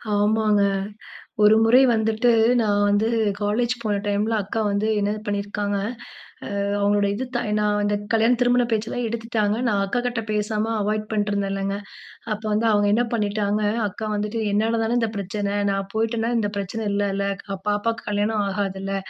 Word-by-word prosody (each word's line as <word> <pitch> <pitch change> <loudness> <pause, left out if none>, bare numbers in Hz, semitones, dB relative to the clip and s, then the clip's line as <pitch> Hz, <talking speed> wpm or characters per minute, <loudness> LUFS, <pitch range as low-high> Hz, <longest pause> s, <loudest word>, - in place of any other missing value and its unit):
ஆமாங்க. 210 0 +2 0.8
ஒரு 210 +1 +7
முறை 240 +3 +6
வந்துட்டு 220 +1 +2 0.3
நான் 205 -2 +2
வந்து 205 +2 +2 0.3
காலேஜ் 225 +4 0
போன 210 -2 0
டைம்ல 210 +2 0
அக்கா 220 +3 -3
வந்து 200 +2 0
என்னது 205 +1 -1
பண்ணியிருக்காங்க, 205 0 -2 0.8
அ - - 0 0.2
அவங்களோட 205 0 +2
இது 255 +5 -3
தா 240 - +1 0.2
நான் 210 0 +1
அந்த 205 0 +1 0.2
கல்யாண 225 +2 +4
திருமண 245 0 +3
பேச்செல்லாம் 225 +2 -1
எடுத்துட்டாங்க. 225 -2 -1
நான் 205 -2 +1
அக்காகிட்ட 240 +2 -2
பேசாம 215 +1 -1
அவாய்ட் 215 +1 -1
பண்ணிட்டுருந்தேன்லங்க. 200 -2 -1 0.6
அப்ப 215 +1 -4
வந்து 220 +2 +1
அவங்க 205 -1 +3
என்ன 240 +3 +3
பண்ணிட்டாங்க, 210 -1 0 0.3
அக்கா 215 +2 -6
வந்துட்டு 210 +2 -2
"என்னால 225 +2 +1
தானே 230 +2 0
இந்த 225 -1 0
பிரச்சனை 200 +1 -3 0.2
நான் 195 0 -2
போயிட்டேன்னா 225 +1 0
இந்த 205 -2 0
பிரச்சனை 200 +3 -3
இல்லல 200 -1 0 0.2
க 200 - -16 0.2
பாப்பாக்கு 225 +3 -1
கல்யாணம் 210 +1 0
ஆகாதுல்ல. 195 0 -3
210 Hz, 150 wpm, -23 LUFS, 205-225 Hz, 0.8 s, ஒரு